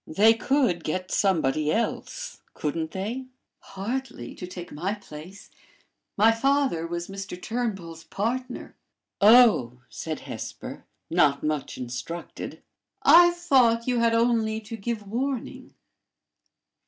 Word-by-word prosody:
"They 210 +8 +5
could 230 - +1
get 185 +3 -3
somebody 155 -6 +2
else, - - -3
couldn't 160 +1 -2
they?" 225 +9 -4 0.3
"Hardly, 200 - -5
to 180 - -8
take 180 -1 -8
my 185 +7 -2
place. 185 -1 -12 0.7
My 220 +3 +6
father 265 -8 +1
was 170 0 -4
Mr. 195 -2 -7
Turnbull's 195 -9 -4
partner." 245 +8 -4 0.5
"Oh!" 205 - +6
said 160 -2 -5
Hesper, - - -7 0.3
not 150 -5 +3
much 150 -2 -2
instructed. 125 +7 -6 0.4
"I 345 +1 +8
thought 265 -10 +3
you 250 -1 +1
had 230 0 +3
only 230 -2 +2
to 220 +2 -7
give 225 0 -4
warning." 255 +4 -4
205 Hz, 115 wpm, -26 LUFS, 165-240 Hz, 0.7 s, I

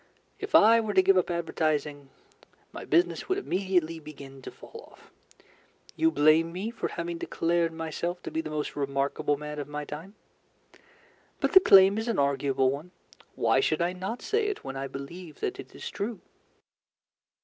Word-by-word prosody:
If 410 - -2
I 225 +2 +7
were 210 -2 -3
to 190 - +6
give 195 +1 +5
up 180 -1 +2
advertising, 155 -4 -2 0.6
my - - -8
business 170 - +1
would 375 - +1
immediately 180 - 0
begin 140 -3 -11
to - - -8
fall 460 +1 -13
off. - - -20 0.8
You 325 - +3
blame 160 - +4
me 195 +6 -4
for 235 - -3
having 170 0 -5
declared 170 0 0
myself 165 +2 -4
to - - -6
be 160 - -1
the 160 - -7
most 150 -1 -4
remarkable 140 +1 -1
man 150 0 -6
of 145 - -5
my 150 0 -5
time. 165 +9 -9 1.2
But - - 0
the 380 - +11
claim 195 - +6
is 225 - -4
an 230 - 0
arguable 135 -1 +1
one. 145 +6 -6 0.5
Why 130 - +2
should 155 +3 +1
I 175 +1 0
not 190 +6 -5
say 435 0 0
it 415 - -4
when 135 - -6
I 135 0 -4
believe 150 +5 -9
that 395 -1 -3
it - - -10
is - - -7
true? 225 - -4
165 Hz, 175 wpm, -28 LUFS, 145-195 Hz, 1.2 s, the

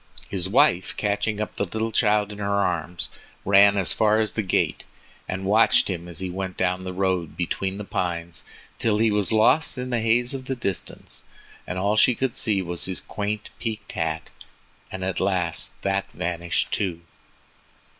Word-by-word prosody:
His 95 -1 -1
wife, 115 -6 +3
catching 105 +1 0
up 105 - -4
the 110 +4 -1
child 105 -2 +2
in 105 - -9
her 100 0 0
arms, 85 -6 -1 0.4
ran 100 +1 +6
as 95 -3 +2
far 110 0 +3
as 110 -1 0
the 110 - 0
gate, 95 - 0 0.5
and 95 +1 -3
watched 105 0 +4
him 85 -1 -5
as 85 -2 -9
he 95 - -3
went 95 0 -4
down 95 0 0
the 95 - -3
road 90 -3 -1
between 95 +2 -2
the 105 - -5
pines 85 -3 -3 0.4
till 110 -2 +2
he 110 0 +3
was 105 0 0
lost 130 +8 +4
in 125 0 -4
the 120 -2 +1
haze 120 +3 +2
of 130 -1 -5
the 130 - -2
distance 100 -7 -4 0.4
and 90 - -3
all 100 +3 +1
she 120 +2 +5
could 130 -1 -1
see 100 -4 +1
was 85 -1 -2
his 95 -1 -3
quaint 105 0 -4
peaked 110 -3 -4
hat, 80 -1 -3 0.6
and 95 0 -5
at 95 -2 -1
last 90 -4 0
that 95 0 -1
vanished 85 0 -1
too. 90 -4 -1
100 Hz, 175 wpm, -24 LUFS, 90-110 Hz, 0.6 s, ran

